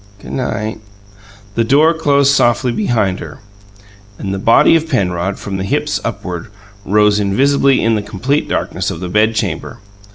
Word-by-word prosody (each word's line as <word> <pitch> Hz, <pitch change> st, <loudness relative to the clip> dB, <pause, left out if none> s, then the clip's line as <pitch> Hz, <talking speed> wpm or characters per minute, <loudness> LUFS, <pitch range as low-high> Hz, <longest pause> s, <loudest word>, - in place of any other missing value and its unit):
"G' -, -, -11 dB
night!" 110 Hz, -4 st, -3 dB, 0.7 s
The 115 Hz, -, +1 dB
door 145 Hz, +7 st, +4 dB
closed 140 Hz, -3 st, +2 dB
softly 120 Hz, -1 st, +2 dB
behind 110 Hz, -, 0 dB
her, -, -, -9 dB, 0.8 s
and 95 Hz, -1 st, -4 dB
the 95 Hz, -, -3 dB
body 115 Hz, +9 st, +5 dB
of 160 Hz, 0 st, 0 dB
Penrod, 95 Hz, -, -1 dB
from 100 Hz, -1 st, -5 dB
the 95 Hz, -, -3 dB
hips 95 Hz, -, -1 dB
upward, 90 Hz, -2 st, -5 dB, 0.4 s
rose 105 Hz, +1 st, +3 dB
invisibly 135 Hz, +7 st, +2 dB
in 115 Hz, -, +2 dB
the 105 Hz, -, 0 dB
complete 130 Hz, +9 st, -2 dB
darkness -, -, -2 dB
of -, -, -5 dB
the 90 Hz, 0 st, -5 dB
bedchamber. 105 Hz, -2 st, -1 dB
110 Hz, 155 wpm, -16 LUFS, 95-135 Hz, 0.8 s, body